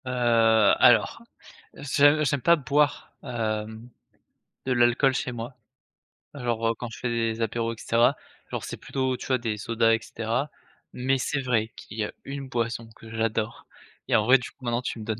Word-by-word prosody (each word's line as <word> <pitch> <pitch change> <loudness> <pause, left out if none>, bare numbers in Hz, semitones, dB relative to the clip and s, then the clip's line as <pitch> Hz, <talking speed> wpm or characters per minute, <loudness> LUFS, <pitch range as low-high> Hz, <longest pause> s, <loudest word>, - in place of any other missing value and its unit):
Heu, - - -5 0.7
alors, - - +4 0.5
je 145 +2 +3
j'aime 140 -2 0
pas 170 +5 +5
boire, 145 0 0
hem, 110 -2 -4 0.8
de 130 - +1
l'alcool 120 +2 +3
chez 125 - -2
moi. 120 +2 -7 0.8
Alors, 120 -4 -2
heu, - - +1
quand 120 - -6
je - - -10
fais 125 - -2
des 115 -1 -1
apéros 115 +1 -1
et - - -13
cetera, 115 +1 +2 0.3
genre, - - -4
c'est - - -6
plutôt, 130 -1 -2
tu - - -8
vois, 130 - +2
des 115 -3 -3
sodas 115 +2 +2
et 115 - +2
cetera, 115 +6 -3 0.4
mais 130 +2 0
c'est 135 +2 -2
vrai 115 -4 0
qu'il 105 - -11
y 105 - 0
a - - -8
1 140 0 -6
boisson 115 -2 -3
que 115 - -14
j'adore 115 0 -2 0.4
et - - +2
en 105 - +4
vrai, 130 +3 +7
du 125 - -7
coup, 135 - -23
maintenant 120 0 0
tu 125 - -4
me - - -6
donnes 110 0 -3
120 Hz, 190 wpm, -26 LUFS, 115-130 Hz, 0.8 s, vrai